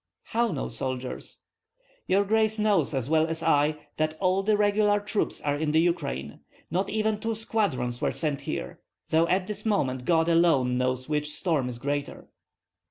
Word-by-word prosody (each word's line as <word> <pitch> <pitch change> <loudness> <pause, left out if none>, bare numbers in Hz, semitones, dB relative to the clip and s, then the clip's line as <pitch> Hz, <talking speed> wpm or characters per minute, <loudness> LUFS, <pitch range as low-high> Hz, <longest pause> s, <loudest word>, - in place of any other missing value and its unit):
"How 235 -1 0
no 150 - -3
soldiers?" 130 -1 -5 0.7
"Your 200 +2 +3
grace 220 +1 +2
knows 205 -8 +2
as 130 -2 -1
well 160 +1 +3
as 165 0 -3
I 150 -1 +2
that 155 0 -1
all 185 0 +2
the 210 +1 +2
regular 205 0 +3
troops 205 +1 -2
are 145 -1 0
in 150 0 -1
the 160 - +5
Ukraine. 165 - -1 0.3
Not 190 +4 0
even 215 0 0
two 225 +1 -2
squadrons 195 - -1
were - - +1
sent 150 -4 -2
here, 60 +1 -5 0.3
though 165 +1 +3
at 185 +1 +1
this 210 +1 -5
moment 130 - 0
God 165 -1 +3
alone 165 -7 +3
knows 130 0 -1
which 150 -1 -1
storm 150 -6 -1
is 120 - -6
greater." 145 +3 -4
165 Hz, 170 wpm, -27 LUFS, 140-205 Hz, 0.7 s, the